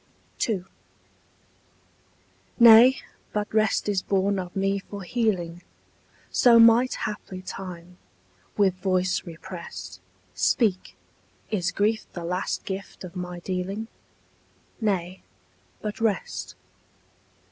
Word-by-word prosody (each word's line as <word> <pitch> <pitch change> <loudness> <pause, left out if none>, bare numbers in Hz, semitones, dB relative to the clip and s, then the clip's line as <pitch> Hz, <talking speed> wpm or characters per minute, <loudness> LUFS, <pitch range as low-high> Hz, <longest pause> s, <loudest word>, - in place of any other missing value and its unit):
II. 190 -5 -1 1.9
Nay, 235 +3 +9 0.4
but 210 0 -2
rest 215 -1 +2
is 200 -2 +1
born 195 +1 +1
of 180 -1 -7
me 195 0 +1
for 200 0 -9
healing, 180 -5 -1 0.7
—So 240 -2 +6
might 230 +2 +6
haply 190 -3 -6
time, 180 -2 -8 0.6
with 195 -3 +4
voice 185 0 0
represt, 170 +1 -8 0.3
Speak: 205 -6 +1 0.6
is 180 -5 0
grief 215 +2 0
the 170 -1 -6
last 180 +2 -2
gift 195 0 -6
of 180 0 -9
my 180 -1 -6
dealing? 190 +5 -4 0.9
Nay, 190 -4 -1 0.6
but 210 +1 -4
rest. 175 - -2
195 Hz, 100 wpm, -25 LUFS, 180-215 Hz, 1.9 s, Nay